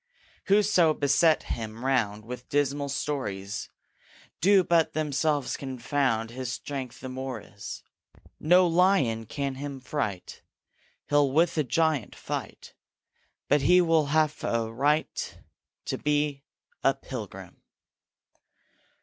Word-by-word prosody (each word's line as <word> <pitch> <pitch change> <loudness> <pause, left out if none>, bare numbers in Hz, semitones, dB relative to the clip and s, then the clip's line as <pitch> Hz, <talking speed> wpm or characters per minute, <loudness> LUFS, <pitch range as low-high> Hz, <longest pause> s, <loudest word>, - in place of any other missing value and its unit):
Whoso 195 -6 +4
beset 150 +3 +3
him 115 +2 -5
round 110 -6 0
With 125 +1 -8
dismal 145 0 0
stories, 105 -9 -3 0.7
Do 195 +2 +5
but 170 -2 +2
themselves 150 -2 0
confound; 130 -3 -1
His 125 0 -4
strength 130 0 -6
the 130 - -6
more 130 -2 -5
is. 100 0 -9 0.6
No 180 +4 +5
lion 165 - +2
can 140 +2 -3
him 140 -2 -5
fright; 120 -8 -4 0.7
He'll 145 -2 +3
with 165 +5 +3
a - - +3
giant 145 -2 0
fight; - - -6 0.7
But 145 0 +3
he 180 +7 +5
will 165 -4 +3
have 155 0 +1
a 115 -1 -1
right 145 +6 0 0.5
To - - -3
be 145 -1 0 0.4
a - - +4
Pilgrim. - - -8
140 Hz, 115 wpm, -27 LUFS, 125-155 Hz, 0.7 s, Do